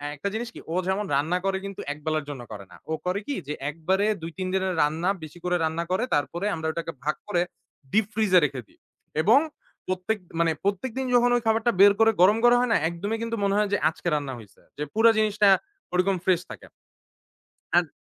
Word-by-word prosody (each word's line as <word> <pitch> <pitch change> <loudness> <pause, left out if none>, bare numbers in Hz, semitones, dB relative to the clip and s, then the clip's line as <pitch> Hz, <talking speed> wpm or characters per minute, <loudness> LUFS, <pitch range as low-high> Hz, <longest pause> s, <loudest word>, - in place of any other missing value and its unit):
একটা 200 +8 -3
জিনিস 235 +1 -3
কি - - -8
ও - - -1
যেমন 200 +2 0
রান্না 160 +6 +1
করে 195 0 +1
কিন্তু 195 -1 -6
একবেলার 155 0 -3
জন্য 135 -4 -6
করে 100 -2 -8
না। - - -13 0.2
ও - - +1
করে 185 +2 0
কি 285 - -2
যে 150 - -2 0.2
একবারে 185 +6 0 0.2
২-৩ 175 +3 -5
দিনের 190 -1 0
রান্না 160 +5 0
বেশি 155 +3 -10
করে 180 0 +1
রান্না 160 +2 -1
করে 190 +6 +1
তারপরে 170 +6 -2
আমরা 160 0 -4
ওটাকে 165 0 -4
ভাগ 150 +1 0
করে 175 -4 +1 0.5
দীপ 215 -1 +3
ফ্রিজ 215 -4 +1
এ - - +9
রেখে 135 -3 -4
দিই। - - -27 0.4
এবং 230 +8 +6 0.5
প্রত্যেক 185 +4 -1 0.2
মানে 165 -1 +3
প্রত্যেকদিন 255 +6 -1
যখন 245 0 +5
ওই 240 - +1
খাবারটা 225 +2 +3
বের 200 0 +8
করে 225 0 +6
গরম 205 +4 +6 0.2
হয় 250 - 0
না - - +5
একদমই 205 +6 -3
কিন্তু 230 0 -2
মনে 200 0 +2
হয় 210 -1 +2
যে - - +4
আজকে 175 - -8
রান্না 140 -3 -3
হইছে। 105 -2 -16 0.2
যে 150 - -2
পুরা 225 +1 +6
জিনিসটা 210 -1 +3 0.4
ওরকম 185 +2 +2
ফ্রেশ 180 -2 +3
থাকে। - - -10 1.1
আত - - +3
185 Hz, 205 wpm, -25 LUFS, 160-210 Hz, 1.1 s, এ